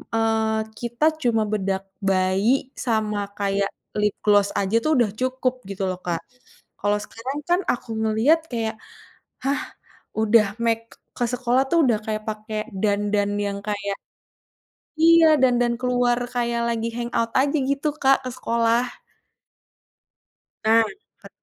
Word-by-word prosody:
eee, 220 -1 +1 0.2
kita 240 +5 -1 0.2
cuma 225 -4 +2
bedak 195 -2 -1 0.2
bayi 195 +7 +1
sama 210 -4 -1
kayak 200 0 0 0.3
lip 210 -1 +1
gloss 205 -1 +4
aja, 200 +3 0
tuh, 310 -3 +2
udah 225 -5 +3
cukup 255 0 -1
gitu, 195 0 -3
loh, 185 0 -5
Kak. 170 -2 -2 0.6
Kalau 205 +1 +1
sekarang 260 +7 -6
kan 350 +1 +4
aku 245 - -5
ngeliat 245 +10 +3
kayak, 225 -2 -2 0.7
hah, 275 +2 0 0.5
udah 220 0 +4 0.2
make 230 0 0 0.3
ke 245 - +1
sekolah, 250 +1 +2
tuh, 335 -1 +4
udah 230 -4 +3
kayak 215 0 -2
pake 215 0 -4
dandan 205 0 +1
yang 200 0 -2
kayak 200 -1 -2 1.0
iya, 325 -2 +6
dandan 245 -2 +3
keluar 245 -1 +1 0.2
kayak 235 -1 0
lagi 230 -1 -1
hang 240 0 -3
out 230 0 +1
aja 280 +3 +2
gitu, 280 +2 -1
Kak, 270 -3 +2
ke - - -2
sekolah. 235 0 +1 1.7
Nah, 225 +1 +5 0.4
ket - - -12
230 Hz, 135 wpm, -23 LUFS, 210-250 Hz, 1.7 s, iya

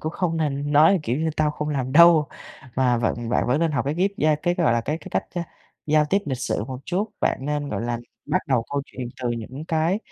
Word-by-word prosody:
cũng 155 +1 -3
không 170 -3 -1
nên 145 -2 -1
nói, 160 +5 +6
kiểu 120 -2 -1
như: 160 0 0
"Tao 150 -1 +2
không 150 0 -4
làm 130 -3 -2
đâu" 165 -2 +7 0.5
mà 125 -2 +3
vận 120 0 -1
bạn - - +1
vẫn 130 +6 +1
nên 165 - +2
học 140 - -1
cái 145 +2 -1
ghép 190 +3 +1
gia 155 0 +3
cái, 175 +4 -1
gọi 170 -9 +2
là, 120 - +2
cái 150 +7 -3
cái - - -11
cách, - - 0
a, 175 - -2 0.4
giao 155 0 +4
tiếp 195 +7 +2
lịch 130 -3 -2
sự 105 - -2
một 130 +1 -6
chút. 195 +5 -1
Bạn - - +1
nên, 145 -1 -2
gọi 105 +1 -3
là, 120 0 -2 0.3
bắt 185 - +1
đầu 130 -4 +2
câu 140 -1 0
chuyện 125 -2 -7
từ 125 - 0
những 120 +5 -6
cái 165 +4 +1
150 Hz, 255 wpm, -23 LUFS, 130-165 Hz, 0.5 s, đâu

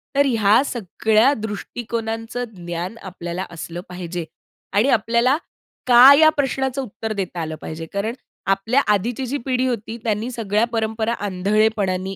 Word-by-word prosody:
तर 285 - +4
ह्या 225 -3 +4
सगळ्या 220 +3 +2
दृष्टिकोनांचं 225 +1 -4
ज्ञान 175 +4 -5
आपल्याला 180 0 -5
असलं 170 +1 -6
पाहिजे 175 -1 -5 0.5
आणि 220 +7 +3
आपल्याला 235 +5 +3 0.5
का 250 +3 +9
या 315 - +8
प्रश्नाचं 270 -1 0
उत्तर 220 -2 -5
देता 185 -4 -4
आलं 160 -1 -4
पाहिजे. 160 +1 -6
कारण 200 +3 -1 0.4
आपल्या 225 +8 +1
आधीची 235 +6 -1
जी 265 +3 -2
पिढी 255 -1 +1
होती, 230 -1 -3
त्यांनी 220 +1 -1
सगळ्या 220 -1 0
परंपरा 220 0 -1
आंधळेपणाने 195 -1 0
220 Hz, 135 wpm, -21 LUFS, 190-240 Hz, 0.5 s, का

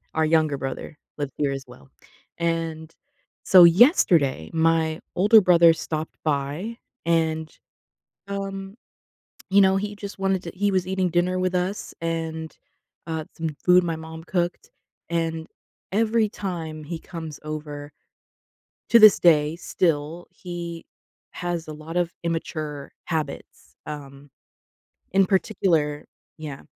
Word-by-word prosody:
our 160 - +2
younger 155 -2 +2
brother 135 +3 -6 0.2
lives 145 -2 -4
here 145 -2 0
as 135 0 -5
well. 125 +2 -16 0.5
And 165 -1 -2 0.5
so 185 -2 +8
yesterday, 170 - +4
my 160 -1 +1 0.2
older 210 +4 +7
brother 170 -3 +6
stopped 160 -1 -4
by 155 +10 -2 0.3
and, 160 -1 0 0.8
um, 195 0 -5 0.8
you 200 0 +6
know, 190 0 +4
he 205 +1 -3
just 200 -1 -8
wanted 195 -1 +1
to 170 - -6
he 200 +2 +1
was 185 -1 0
eating 190 -1 0
dinner 175 +2 +1
with 185 0 0
us 180 +3 -2
and, 160 -1 -4 0.5
uh, 160 -1 -3
some 160 -2 -3
food 180 0 +6
my 165 -1 -2
mom 160 0 -9
cooked. 175 0 -2 0.4
And 165 -1 -1 0.5
every 220 +2 +2
time 165 -7 -5
he 165 +2 -5
comes 160 -4 -8
over 150 -1 -6 1.0
to 235 - +7
this 215 -2 +8
day, 155 -2 +4
still, 165 -1 -1
he 170 -2 -7 0.5
has 175 -2 -4
a 155 - -6
lot 155 +3 -6
of 175 -1 0
immature 155 -4 -4
habits, 155 -3 -5
um. 140 -1 -9 0.9
In 195 0 +5
particular 165 -7 0 0.3
Yeah. 150 -3 -7
165 Hz, 130 wpm, -24 LUFS, 155-185 Hz, 1.0 s, so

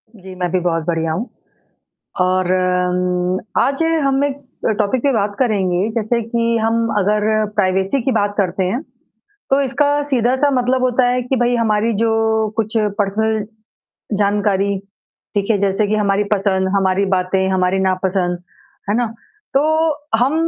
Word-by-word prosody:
जी, 190 -2 -11
मैं 180 -1 -2
भी 185 - +1
बहुत 165 -2 -1
बढ़िया 165 -2 -1
हूँ। 205 +10 -3 0.9
और 185 0 +1
अम्म, 180 0 0 0.2
आज 275 +4 +1 0.2
हम 275 0 +2
एक 285 0 -4 0.3
अ, - - +3
टॉपिक 215 +4 +1
पे 285 - +3
बात 205 -2 0
करेंगे, 200 -4 +1
जैसे 230 +1 0
कि 230 0 0
हम 230 +1 +1
अगर 210 +2 +1
प्राइवेसी 190 +5 +1
की 265 - +1
बात 205 -3 +1
करते 190 -1 0
हैं, 200 +9 -1 0.7
तो 270 - +3
इसका 280 +2 +1 0.2
सीधा-सा 260 +1 +2
मतलब 255 0 +1
होता 255 0 +2
है 250 +1 +1
कि 250 +2 -1
भई 245 0 +2
हमारी 225 -1 +1
जो 225 - +2 0.5
कुछ 220 -1 -1 0.3
पर्सनल 215 +1 0 0.7
जानकारी, 200 -1 +1 0.6
ठीक 200 +1 0
है, 210 - +2
जैसे 200 +1 +1
कि 215 - +1
हमारी 205 -1 +1
पसंद, 190 -2 +1
हमारी 195 0 +2
बातें, 185 +1 0
हमारी 185 0 +1
नापसंद, 185 -1 0 0.5
है 205 - +2
ना? 240 -1 +1 0.5
तो 275 +2 +3 0.5
हम 250 +5 +2
205 Hz, 150 wpm, -18 LUFS, 185-235 Hz, 0.9 s, अ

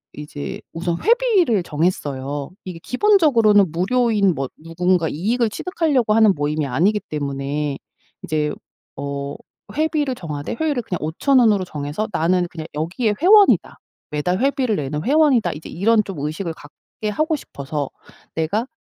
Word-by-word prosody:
이제 150 -1 -7
우선 170 +1 -2
회비를 420 - +3
정했어요. 145 -4 -2
이게 180 -2 -6
기본적으로는 250 - +4
무료인 205 +1 +2
뭐 135 -1 -2 0.2
누군가 175 +1 +1
이익을 225 +8 0
취득하려고 285 - 0
하는 220 -2 +5
모임이 150 0 -1
아니기 185 +12 +2
때문에 140 0 -3 0.4
이제 150 -1 -1 0.4
어 140 0 -4 0.4
회비를 300 -3 0
정하되 150 -8 -5
회율을 290 -6 0
그냥 180 - -4
5,000 220 - +2
원으로 215 -5 +4
정해서 150 +6 -4
'나는 175 +2 +2
그냥 160 -2 -7
여기에 180 +8 -1
회원이다. 400 +4 +5 0.3
매달 150 +5 -1
회비를 260 -3 +1
내는 150 0 -3
회원이다.' 280 - +3
이제 150 +2 -9
이런 215 +5 +2
좀 195 -6 -7
의식을 155 +4 -3
갖게 160 +8 -8
하고 310 +8 0
싶어서 140 - -5 0.5
'내가 185 +10 -1
180 Hz, 330 characters per minute, -21 LUFS, 150-245 Hz, 0.5 s, 하는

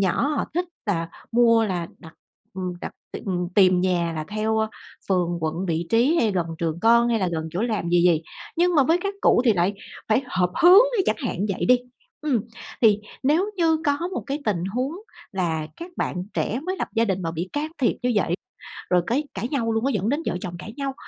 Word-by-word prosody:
nhỏ 195 +9 +1
họ 300 - 0
thích 355 +2 +1 0.2
là 195 -5 +1
họ - - -18
mua 230 -1 +5
là 175 -5 -2
đặt, 160 -2 -13 0.4
ừm, 185 -1 -3
đặt - - -6 0.2
tìm - - -7 0.3
tìm 185 -3 +5
nhà 175 -2 +1
là 155 -1 -4
theo, 215 +1 0
ơ, 220 0 +1 0.4
phường, 175 -2 +1
quận, 160 +4 -2
vị 165 0 -1
trí 250 +9 +4
hay 225 -9 +3
gần 175 -3 0
trường 165 0 -2
con 235 +1 +5
hay 230 -1 +2
là 185 -3 0
gần 160 -1 -3
chỗ 180 +7 -2
làm 215 -7 -1
gì 175 0 +4
gì, 170 -3 +4 0.3
nhưng 350 +1 +3
mà 290 - +6
với 325 +6 +3
các 400 0 -2
cụ - - +4
thì 230 - +5
lại 185 +2 +1 0.3
phải 220 +5 +3
hợp 180 -6 0
hướng, 370 +5 +9 0.2
chẳng - - +2
hạn 245 - -3
như 205 - +1
vậy - - -2
đi. 250 0 +6 0.4
Ừm. 285 -8 +1 0.4
Thì 215 -3 +6 0.2
nếu 320 +10 +2
như 325 -2 +3
có 290 +5 +1
một - - -3
cái 280 +1 -2
tình 185 -6 0
huống 250 +9 -2 0.4
là 165 -5 -1
các 345 +2 -8
bạn 180 0 -2
trẻ 235 - -1
mới 370 +5 -3
lập - - -3
gia 230 0 +3
đình 190 -4 -1
mà 165 - -2
bị 170 +3 -4
can 300 +2 -2
thiệp 255 - +2
như 250 0 +1
vậy, 180 -4 +2 0.6
rồi 180 -1 +4
cái 260 +6 +1
cãi 200 +5 -3
nhau 240 -5 -1
luôn 225 +2 0
á, 275 - +2
dẫn 205 +3 0
đến 290 - +1
vợ - - -1
chồng 175 -1 -5
cãi 215 - -8
nhau, 275 -1 -2
215 Hz, 230 wpm, -24 LUFS, 180-270 Hz, 0.6 s, hướng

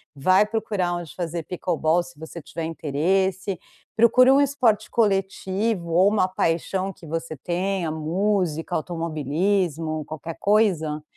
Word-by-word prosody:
vai 185 +9 +4
procurar 205 -5 -1
onde 175 -3 -7
fazer 170 -1 -3
pickleball, 170 -1 0
se 170 - -12
você 160 +2 -9
tiver 165 +2 -6
interesse. 180 +5 -1 0.4
Procura 250 +3 +6
um 280 - +5
esporte 245 -7 +1
coletivo, 195 -2 0
ou 185 +4 +5
uma 205 -3 +2
paixão 185 +2 -1
que 180 - -15
você 160 0 -4
tenha, 180 +2 -2
música, 170 +1 -1
automobilismo, 160 0 -1
qualquer 155 +2 -7
coisa, 175 -8 +2
175 Hz, 125 wpm, -24 LUFS, 160-195 Hz, 0.4 s, Procura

